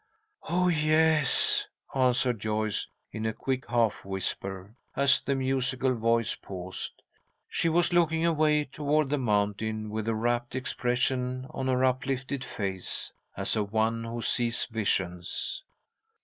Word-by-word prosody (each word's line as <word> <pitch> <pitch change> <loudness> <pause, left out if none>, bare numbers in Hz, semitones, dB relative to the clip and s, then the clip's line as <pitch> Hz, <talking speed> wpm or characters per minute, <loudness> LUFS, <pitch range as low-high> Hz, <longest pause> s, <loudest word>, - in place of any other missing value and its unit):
"Oh, 180 +2 +2
yes," 155 -2 +4 0.3
answered 125 -3 +2
Joyce, 110 0 -1 0.2
in 110 0 -3
a 110 - -1
quick 130 +2 -3
half 115 -3 +1
whisper, 95 +1 -4 0.2
as 140 0 +4
the 140 - 0
musical 130 0 +1
voice 115 -1 +1
paused. 95 -1 -7 0.4
She 165 - 0
was 175 +2 +2
looking 165 -1 +3
away 155 -2 +3
toward 145 +1 0
the 145 - +1
mountain 110 -1 0
with 110 0 -3
a 115 - +1
rapt 120 +2 -1
expression 125 0 -1
on 130 - -3
her 130 0 +3
uplifted 130 +1 -1
face, 95 -6 -2 0.2
as - - 0
of 105 -2 -1
one 110 +1 +1
who 115 0 -4
sees 120 -1 +1
visions. 95 - -1
125 Hz, 130 wpm, -28 LUFS, 110-140 Hz, 0.4 s, yes